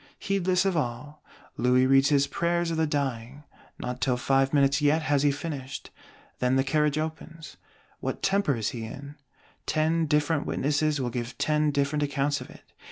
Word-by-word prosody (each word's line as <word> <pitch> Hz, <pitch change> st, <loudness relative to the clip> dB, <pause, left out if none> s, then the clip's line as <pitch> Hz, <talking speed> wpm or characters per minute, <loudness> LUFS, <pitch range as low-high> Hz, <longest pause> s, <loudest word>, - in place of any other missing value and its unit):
Heedless 185 Hz, -1 st, 0 dB
of 190 Hz, -2 st, +1 dB
all, 145 Hz, +1 st, -3 dB, 0.4 s
Louis 125 Hz, +1 st, +3 dB
reads 135 Hz, +1 st, +4 dB
his 140 Hz, -2 st, +3 dB
Prayers 170 Hz, +4 st, -1 dB
of 165 Hz, -, -2 dB
the 160 Hz, 0 st, +2 dB
Dying; 135 Hz, -2 st, -3 dB, 0.3 s
not 125 Hz, +1 st, -5 dB
till 130 Hz, -1 st, +1 dB
five 135 Hz, +1 st, +2 dB
minutes 140 Hz, 0 st, +3 dB
yet 150 Hz, +2 st, +3 dB
has 145 Hz, -3 st, +2 dB
he 145 Hz, -, +4 dB
finished; 145 Hz, -2 st, -6 dB, 0.5 s
then 125 Hz, +1 st, +2 dB
the 135 Hz, -, +3 dB
Carriage 150 Hz, +1 st, +1 dB
opens. 160 Hz, +1 st, -6 dB, 0.4 s
What -, -, -4 dB
temper 195 Hz, -7 st, +2 dB
he -, -, -5 dB
is 105 Hz, -, -1 dB
in? 130 Hz, +5 st, -7 dB, 0.5 s
Ten 160 Hz, +1 st, +1 dB
different 150 Hz, 0 st, +1 dB
witnesses 150 Hz, +1 st, 0 dB
will 125 Hz, -2 st, -2 dB
give 120 Hz, 0 st, -5 dB
ten 150 Hz, 0 st, +1 dB
different 145 Hz, +1 st, 0 dB
accounts 145 Hz, 0 st, 0 dB
of -, -, -9 dB
it. -, -, -15 dB
145 Hz, 170 wpm, -27 LUFS, 135-155 Hz, 0.5 s, reads